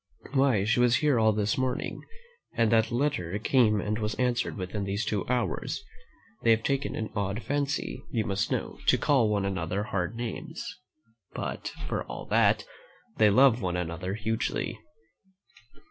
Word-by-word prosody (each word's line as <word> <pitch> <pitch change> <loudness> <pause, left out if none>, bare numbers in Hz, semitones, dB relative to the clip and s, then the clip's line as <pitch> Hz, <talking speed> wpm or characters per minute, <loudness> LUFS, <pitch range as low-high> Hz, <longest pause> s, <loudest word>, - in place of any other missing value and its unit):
Why, 135 -7 +3
she 115 +4 +2
was 125 -1 +5
here 145 -3 +3
all 110 0 +5
this 105 +2 0
morning, 130 -1 -2 0.5
and 115 -1 +2
that 115 -1 +4
letter 120 -8 0
came 110 -2 +3
and 105 +2 -2
was 105 -1 -2
answered 125 -2 0
within 100 +2 -3
these 100 +3 -2
two 105 -3 -1
hours. 125 -2 -1 0.6
They 115 - +2
have 110 0 +4
taken 140 0 -1
an 110 - -4
odd 100 +2 -2
fancy, 145 +1 -2
you 115 -8 -1
must 100 -1 -1
know, - - -2
to - - +6
call 130 -7 +3
one 100 -2 +1
another 95 0 -1
hard 95 0 -2
names; 120 +9 -6 0.6
but, - - -4 0.2
for - - -2
all - - -7
that, - - +4 0.5
they 105 -1 +6
love 125 +2 +5
one 90 -2 -1
another 90 +2 -3
hugely.' 110 +1 -2
110 Hz, 160 wpm, -28 LUFS, 100-125 Hz, 0.6 s, to